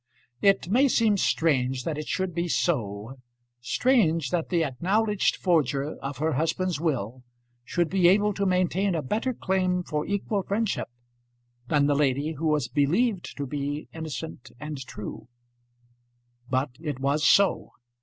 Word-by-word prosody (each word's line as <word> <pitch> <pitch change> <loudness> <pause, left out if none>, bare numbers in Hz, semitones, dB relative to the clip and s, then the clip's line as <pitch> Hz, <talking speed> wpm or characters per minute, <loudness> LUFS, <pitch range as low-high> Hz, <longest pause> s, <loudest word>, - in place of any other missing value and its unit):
It 195 -3 +3
may 255 +9 +4
seem 225 -5 +3
strange 135 -9 +1
that 155 - -2
it 155 - -6
should 185 -2 -2
be 170 +1 -1
so 120 - -1 0.4
strange 165 - +2
that 170 -2 -1
the 170 -3 +2
acknowledged 195 - +1
forger 150 -4 0
of 135 0 -5
her 155 +2 0
husband's 165 +3 -1
will 130 -7 -2 0.4
should 170 +7 0
be 185 0 +3
able 205 +3 +4
to 200 0 -1
maintain 185 +1 +1
a 155 - -2
better 220 - -1
claim 185 -5 0
for 150 -3 -3
equal 200 0 -1
friendship 205 +3 -1 0.8
than 145 0 +3
the 145 - +3
lady 145 +2 +1
who 160 +2 -2
was 150 -5 +1
believed 180 - 0
to 145 - -3
be 145 +2 -4
innocent 160 -4 -6
and 150 -1 -6
true! 105 - -8 1.2
But 130 +1 0
it 150 -5 -4
was 140 +3 0
so. 195 +6 +4
160 Hz, 145 wpm, -26 LUFS, 140-190 Hz, 1.2 s, may